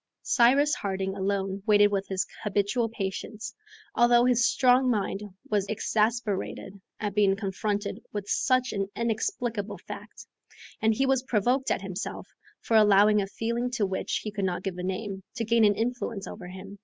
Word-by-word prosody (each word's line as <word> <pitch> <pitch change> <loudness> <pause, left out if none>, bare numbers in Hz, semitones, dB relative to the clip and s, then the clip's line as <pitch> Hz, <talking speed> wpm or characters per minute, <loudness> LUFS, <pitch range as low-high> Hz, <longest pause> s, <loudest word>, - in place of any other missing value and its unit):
Cyrus 275 +4 +4
Harding 195 -1 -2
alone 195 0 -2
waited 205 -1 +5
with 195 -1 -1
his 190 -1 -1 0.2
habitual 210 +3 0
patience, 210 +1 -5 0.4
although 240 0 +5
his 245 -1 +3
strong 255 0 +4
mind 200 -3 -1 0.3
was 205 -2 0
exasperated 210 -2 -1 0.2
at 205 -2 -2
being 200 -1 +3
confronted 205 +1 -3
with 205 -1 -5
such 255 +4 +2
an 195 -1 -1
inexplicable 225 -2 -2
fact, - - -10 0.6
and 220 0 +3
he 270 - +2
was 265 -1 +2
provoked 255 +2 +1
at 195 - 0
himself 190 +1 -5 0.3
for 225 - +2
allowing 210 0 +5
a 195 - -3
feeling 235 +4 -2
to 235 -4 0
which 190 -1 -2
he 215 - -4
could 205 -1 -3
not 180 0 -2
give 185 -2 -4
a - - -4
name, 190 +1 -4
to 230 -2 -2
gain 230 +1 +3
an 205 -1 +5
influence 230 -3 -2
over 185 -4 -8
him. 190 +2 -10
210 Hz, 165 wpm, -27 LUFS, 195-235 Hz, 0.6 s, waited